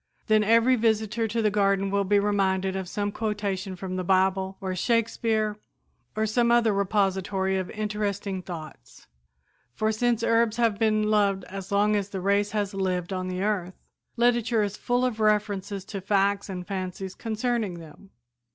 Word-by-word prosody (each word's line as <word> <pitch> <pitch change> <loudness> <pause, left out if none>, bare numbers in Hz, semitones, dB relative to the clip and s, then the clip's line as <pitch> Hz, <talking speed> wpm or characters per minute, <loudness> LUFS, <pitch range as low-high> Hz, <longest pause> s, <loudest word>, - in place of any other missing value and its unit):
Then 215 -1 +4
every 230 +4 +4
visitor 220 0 +1
to 225 +1 -1
the 210 - +3
garden 195 -1 +1
will 200 0 +2
be 205 +2 +3
reminded 195 -2 +1
of 190 -2 -4
some 205 +1 -2
quotation 200 -3 -3
from 185 0 -5
the 185 - -2
Bible, 190 +1 +1
or 190 -1 -3
Shakespeare 220 0 0 0.6
or 215 0 +1
some 235 +2 +2
other 235 -3 +4
repository 195 -1 0
of 185 - -4
interesting 205 -2 -3
thoughts; 165 -4 -10 0.7
for 215 0 +1
since 235 +1 0
herbs 230 -1 +2
have 230 -4 +1
been 215 -1 +2
loved 200 -3 +2
as 195 +1 -8
long 205 +1 +3
as 200 -1 -1
the 195 - -4
race 200 +2 +1
has 205 -1 -2
lived 185 -1 -2
on 185 0 -3
the 185 +1 -3
earth, 190 -4 -1 0.4
literature 235 -2 +2
is 205 -1 -3
full 245 +3 0
of 235 -3 -2
references 205 -2 0
to 200 -2 -6
facts 200 +1 +1
and 180 -2 -5
fancies 190 -1 -5
concerning 225 -3 -2
them. 165 +3 -13
205 Hz, 165 wpm, -26 LUFS, 190-220 Hz, 0.7 s, Then